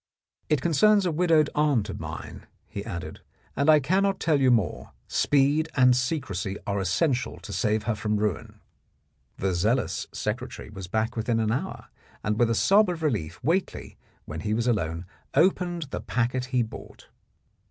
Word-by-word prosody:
" - - -47
It 150 -4 +1
concerns 200 +5 +4
a 175 - +1
widowed 160 -2 +3
aunt 145 -8 +2
of - - -6
mine," - - -8 0.2
he - - -6
added, - - -7 0.3
"and 140 +3 +2
I 155 -1 +7
cannot 190 +7 +1
tell 150 -4 +2
you 130 - +5
more. 110 -9 0
Speed 145 +3 +2
and 125 -2 +5
secrecy 125 -6 -2
are 100 -1 -1
essential 120 - 0
to - - -8
save 110 0 0
her 115 +1 0
from 105 0 -1
ruin." 105 -4 -3 0.8
The 95 -1 0
zealous 110 +9 0
secretary - - -5
was 95 -3 -8
back 110 +5 -1
within 115 0 0
an 110 -1 +1
hour, 125 - -4 0.3
and 105 0 -1
with 120 -1 +4
a 115 - +1
sob 200 - +4
of 170 -2 -4
relief 85 - -1
Whately, 175 +8 -1 0.3
when 75 +2 -6
he 105 +5 -1
was 115 +1 0
alone, 85 -8 -1 0.3
opened 175 +1 +2
the - - -4
packet 125 +1 -1
he 125 -2 +1
brought. 110 - -11
125 Hz, 170 wpm, -26 LUFS, 105-155 Hz, 0.8 s, I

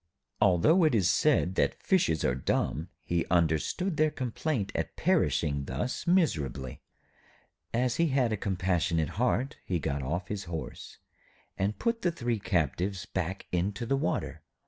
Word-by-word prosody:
Although 105 - +5
it 155 -6 +4
is 95 -6 +3
said 90 - +3
that - - 0
fishes 165 - +2
are 65 - +2
dumb, 70 +4 -1 0.2
he 85 -1 +1
understood 85 - +1
their 155 0 +4
complaint 130 -3 -2
at - - -3
perishing 70 -3 +1
thus 125 - -3
miserably. 75 - 0 0.9
As 125 +1 0
he 170 - +3
had 130 -5 +2
a - - +2
compassionate 90 -5 0
heart, 130 +3 +1
he 90 - -1
got 70 -3 -2
off 85 +7 -3
his 105 -2 -4
horse 80 -2 -7 0.6
and 100 +2 -1
put 230 0 -1
the 175 - +2
three 120 -8 -2
captives 90 +1 -1
back 95 +1 -3
into 95 +6 -1
the 135 - +1
water. 135 -10 -2
95 Hz, 145 wpm, -29 LUFS, 85-130 Hz, 0.9 s, Although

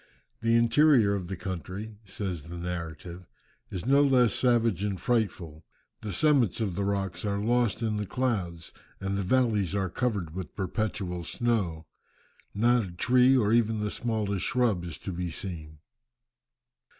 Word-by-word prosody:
"The 115 0 +3
interior 115 -2 +5
of 95 -3 -3
the 95 - -4
country," 95 +4 -6
says 95 -5 -5
the 85 +1 -7
narrative, 85 0 -6 0.4
"is 90 +1 -5
no 140 +2 +5
less 125 -5 +4
savage 115 -6 +2
and 100 -3 -2
frightful. 90 -8 -1 0.4
The 105 - -4
summits 130 - +2
of 105 -5 -1
the 100 +3 -2
rocks 95 -3 -2
are 100 -1 -1
lost 115 +1 +1
in 110 -2 0
the 105 -1 -3
clouds 95 - -2 0.3
and 95 0 -2
the 100 - -1
valleys 105 -3 +1
are 95 -3 -1
covered 100 -8 -2
with 95 -3 -7
perpetual 95 -3 -3
snow. 95 -8 -1 0.7
Not 120 +3 +3
a 95 - -7
tree 125 +7 +4
or 110 -3 +2
even 115 -2 +2
the 105 -1 -2
smallest 105 -5 -2
shrub 115 -8 +1
is 80 -5 -6
to 95 - -6
be 90 0 -3
seen." 80 -3 -7
100 Hz, 155 wpm, -28 LUFS, 90-115 Hz, 0.7 s, interior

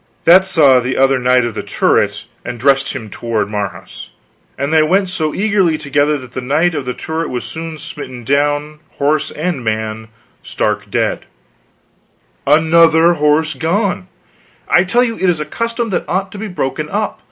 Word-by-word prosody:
"That 185 +3 +7
saw 145 -8 +5
the 125 +1 -2
other 135 0 +3
knight 125 0 +3
of 120 - -3
the - - -4
turret, - - 0 0.2
and 120 -1 -6
dressed 135 +2 +2
him 125 -5 -6
toward 110 -3 -2
Marhaus, 100 -5 -6 0.5
and 140 +3 -2
they 160 - +5
went 185 +5 +2
so 160 -4 -1
eagerly 195 -5 +1
together, 145 0 0
that 130 -3 -11
the 130 - -5
knight 155 +7 +1
of 145 -4 -3
the 125 - -4
turret 160 +1 -4
was 125 -1 -4
soon 160 0 -6
smitten 130 -5 -8
down, 145 +3 0
horse 150 +1 0
and 155 -4 -3
man, 110 0 -3 0.3
stark - - -2
dead - - -1 0.6
" - - -39
"Another 165 +1 +4
horse 150 0 +1
gone; 180 +2 -1 0.6
I 175 - +4
tell 240 +7 +3
you 230 -2 -2
it 190 - +1
is 170 -3 +1
a 150 - -3
custom 230 +6 -3
that - - -1
ought 190 +2 -1
to 200 - -9
be 220 - -4
broken 155 -4 -3
up. 210 +4 -2
150 Hz, 175 wpm, -16 LUFS, 130-175 Hz, 0.6 s, That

